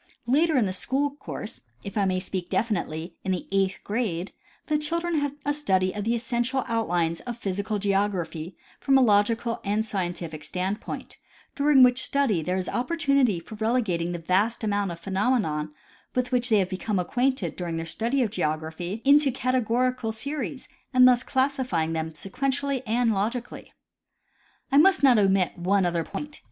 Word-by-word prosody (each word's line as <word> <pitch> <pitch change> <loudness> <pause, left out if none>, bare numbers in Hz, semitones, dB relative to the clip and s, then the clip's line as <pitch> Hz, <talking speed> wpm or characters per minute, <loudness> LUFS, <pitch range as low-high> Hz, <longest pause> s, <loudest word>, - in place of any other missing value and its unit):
Later 300 +5 +3
in 240 - +3
the 185 - -2
school 275 +9 0
course, 275 -6 -8 0.2
if 200 - -7
I 205 -2 +2
may 185 -1 +1
speak 185 -1 -5
definitely, 170 -6 -2
in 190 - -1
the 180 - -2
eighth 195 -1 +1
grade, 200 -5 -2 0.3
the 305 - 0
children 335 +2 0
have 285 -1 -2
a 290 - +1
study 190 -11 +1
of 210 -1 -4
the 230 +1 +1
essential 240 +2 -1
outlines 175 -8 0
of 240 -2 -6
physical 200 0 -2
geography 190 -4 -1 0.2
from 270 -1 +4
a - - +5
logical 225 +2 +2
and 210 +2 0
scientific 175 -6 -4
standpoint, 190 +5 -4 0.4
during 285 -2 +5
which 250 +1 +4
study 260 -13 +1
there 180 +4 -1
is 185 - -3
opportunity 275 - +1
for 170 +6 -12
relegating 215 -6 0
the 175 - -3
vast 195 +8 0
amount 205 -2 0
of 170 - -7
phenomena 190 -5 0 0.5
with 250 0 0
which 250 0 +2
they 220 - +5
have 190 -2 +1
become 195 +2 -2
acquainted 245 - 0
during 170 -2 -4
their 165 - -3
study 235 +10 0
of 220 - -2
geography 160 +4 -3
into 285 0 +6
categorical 255 -1 0
series, 270 +3 -5 0.3
and 255 0 +8
thus 250 -1 +5
classifying 260 - 0
them 160 0 -2
sequentially 265 - -2
and 230 +1 +2
logically. 230 +5 -3 1.0
I 280 - +6
must 380 0 +5
not 250 -5 +6
omit 190 -3 +2
one 190 +2 +2
other 170 -1 0
point. 295 - -7
220 Hz, 165 wpm, -26 LUFS, 185-255 Hz, 1.0 s, and